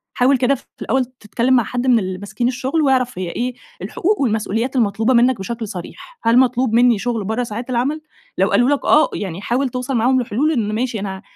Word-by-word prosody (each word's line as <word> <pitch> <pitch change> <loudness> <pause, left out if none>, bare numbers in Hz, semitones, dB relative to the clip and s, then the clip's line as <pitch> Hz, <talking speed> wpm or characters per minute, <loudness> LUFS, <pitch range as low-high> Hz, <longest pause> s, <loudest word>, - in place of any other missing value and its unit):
حاول 260 +2 +3
كده 265 +2 +2
ف - - -11 0.2
في - - -27
الأوّل 265 -1 0
تتكلّم 240 0 -2
مع 245 -2 +4
حد 245 +4 -3
مِن 240 -3 +5
اللي 185 -1 -4
ماسكين 205 +5 -3
الشغل، 265 +5 -1
واعرف 255 -6 +1
هيّ 180 - -3
إيه 245 +7 -3 0.3
الحقوق 410 -1 -1
والمسؤوليات 225 +2 -1
المطلوبة 225 +1 +1
منّك 245 0 +3
بشكل 225 +3 -5
صريح. 195 - -9
هل 230 +2 +4
مطلوب 250 -2 +2
مِنّي 240 -3 +4
شغل 235 -3 -2
برّه 220 +5 -1
ساعات 235 +3 -6
العمل؟ 265 +6 -1 0.4
لو - - +2
قالوا 245 +3 +3
لك 285 - 0
آه، 305 +1 +5
يعني 190 -2 -5
حاول 255 +5 0
توصل 250 +2 -3
معاهم 250 +3 +2
لحلول 245 +7 0
إن 215 -7 -1
ماشي 235 -2 -2
أنا 190 -1 -5
245 Hz, 210 wpm, -19 LUFS, 220-260 Hz, 0.4 s, مِن